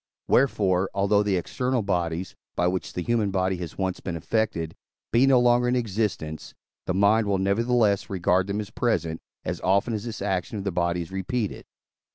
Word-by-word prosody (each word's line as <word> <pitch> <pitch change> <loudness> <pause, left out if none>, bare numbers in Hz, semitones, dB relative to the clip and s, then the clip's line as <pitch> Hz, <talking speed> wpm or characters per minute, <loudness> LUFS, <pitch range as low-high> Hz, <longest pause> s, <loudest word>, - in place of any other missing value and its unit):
Wherefore, 100 -8 +2
although 100 +1 +3
the 105 -2 +1
external 125 +6 -1
bodies, 90 -2 -2 0.2
by 90 - +1
which 90 +1 -1
the 90 - -3
human 115 -2 +1
body 95 -1 0
has 85 -2 -7
once 95 -2 -1
been 85 - -4
affected, 85 -2 -1 0.4
be 120 +4 +4
no 130 -2 +6
longer 120 0 +4
in 125 - +2
existence, 105 -9 -2 0.3
the 90 - 0
mind 105 +3 +4
will 100 -1 +2
nevertheless 105 +1 +2
regard 90 0 +1
them 100 +1 -2
as 105 +1 -8
present, 85 -9 -1 0.2
as - - -3
often 100 +5 +2
as 105 0 -3
this 115 - -5
action 95 +3 -2
of 100 - -4
the 100 - -1
body 85 0 0
is 80 - -13
repeated. 100 +3 -3
100 Hz, 185 wpm, -25 LUFS, 90-110 Hz, 0.4 s, no